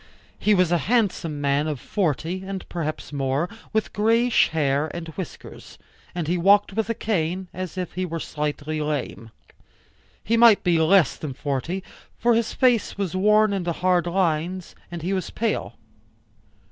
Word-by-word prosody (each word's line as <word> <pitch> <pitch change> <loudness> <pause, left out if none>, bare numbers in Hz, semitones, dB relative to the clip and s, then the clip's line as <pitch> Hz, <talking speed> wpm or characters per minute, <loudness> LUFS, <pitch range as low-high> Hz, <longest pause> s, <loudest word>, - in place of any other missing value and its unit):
He 210 0 +3
was 180 -2 +2
a 175 - +3
handsome 195 -10 +1
man 140 +2 +1
of 150 -4 -3
forty 180 - -2
and 190 0 -6
perhaps 155 -3 -4
more, 140 +3 0 0.2
with 220 -1 -1
grayish 230 +3 +3
hair 150 -1 0
and 170 -1 -6
whiskers, 170 +1 -9 0.4
and 170 -4 -2
he 175 +2 0
walked 200 +3 +4
with 220 +2 -1
a 230 - 0
cane, 185 -3 -2
as 185 0 -6
if 180 -2 -4
he 185 - -2
were 165 -2 -3
slightly 150 0 -3
lame. 150 -6 -3 0.9
He 230 +2 +1
might 230 -3 +6
be 175 -3 +3
less 175 +2 +4
than 150 -4 -5
forty, 145 +7 -3 0.3
for 240 0 +3
his 230 0 +1
face 245 -6 +2
was 190 -4 -2
worn 210 +2 +4
into 175 -3 -1
hard 180 0 +1
lines, 175 0 -1 0.2
and 170 -2 -7
he 185 +3 -1
was 190 -1 -2
pale. 210 - -2
180 Hz, 160 wpm, -24 LUFS, 155-200 Hz, 0.9 s, might